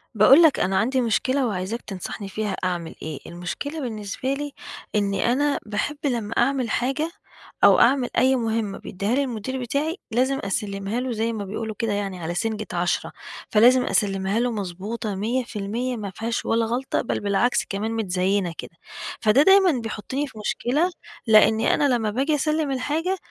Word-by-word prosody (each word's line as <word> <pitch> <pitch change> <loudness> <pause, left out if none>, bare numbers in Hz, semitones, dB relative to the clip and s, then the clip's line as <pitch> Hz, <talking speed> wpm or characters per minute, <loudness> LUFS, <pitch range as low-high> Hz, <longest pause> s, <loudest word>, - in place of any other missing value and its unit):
باقول 255 +9 +7
لك 315 - +5
أنا 190 +1 +1
عندي 255 +5 +2
مشكلة 255 +3 +1
وعايزاك 200 +3 -3
تنصحني 195 +1 -6
فيها 210 0 -2
أعمل 175 -3 -2
إيه، 155 -3 -5
المشكلة 180 - -5
بالنسبة 225 +2 -3
لي 290 +1 -4 0.4
إن 200 -1 +1
أنا 265 +8 +1
باحب 220 +8 -2
لمّا 230 -5 -1
أعمل 255 -1 +2
حاجة، 275 +8 0 0.5
أو - - +7
أعمل 255 0 +4
أي 260 +2 +4
مهمّة 225 -4 -1
بيدّيها 200 +5 -2
لي 280 - +2
المدير 255 +1 -4
بتاعي، 290 - -1
لازم 260 +4 +1
أسلّمها 200 +2 -2
له 255 0 -2
زي 230 0 -1
ما 210 -2 -4
بيقولوا 215 +2 -4
كده 225 -2 0
يعني 200 -2 -3
على 170 0 -3
سنجة 215 +1 -2
عشرة، 175 0 -1 0.4
فلازم 245 +4 +5
أسلّمها 195 0 +1
له 245 0 +1
مضبوطة 205 +1 -4
100% 235 +2 -2
ما 205 -2 -5
فيهاش 225 +4 -3
ولا 230 0 +2
غلطة، 245 +4 -1
بل - - -2
بالعكس 205 +5 +1
كمان 205 +3 -2
متزيّنة 190 -3 0
كده. - - -7 0.5
فده 220 +5 +5
دايمًا 385 0 +6
بيحطّني 230 +6 -3
في 235 - -14
مشكلة 285 - 0 0.4
لإني 220 +1 +5
أنا 280 -4 +3
لمّا 220 -3 0
باجي 275 +7 +1
اسلّم 305 0 0
الحاجة، 310 +8 -1
225 Hz, 160 wpm, -24 LUFS, 200-260 Hz, 0.5 s, باقول